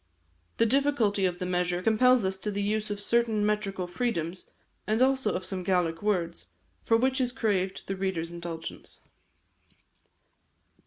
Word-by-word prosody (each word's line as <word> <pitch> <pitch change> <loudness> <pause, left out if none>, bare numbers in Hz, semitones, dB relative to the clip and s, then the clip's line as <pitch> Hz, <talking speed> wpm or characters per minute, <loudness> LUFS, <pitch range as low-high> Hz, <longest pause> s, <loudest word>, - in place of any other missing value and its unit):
The 230 - +4
difficulty 230 -6 +2
of 180 -1 -3
the 180 - -4
measure 180 0 0
compels 240 +1 +4
us 190 0 0
to 210 - -3
the 205 0 -2
use 215 +1 -1
of 205 -1 -3
certain 220 0 +1
metrical 205 -3 -1
freedoms, 175 -4 -3 0.4
and 215 +1 +1
also 265 +1 +2
of 185 - -3
some 190 -1 -3
Gaelic 175 -3 0
words, 180 -5 -1 0.3
for 225 - +3
which 260 +2 +1
is 245 -1 +1
craved 195 -6 -1
the 195 - -3
reader's 185 -3 -2
indulgence. 170 -1 -7
200 Hz, 150 wpm, -28 LUFS, 180-225 Hz, 0.4 s, The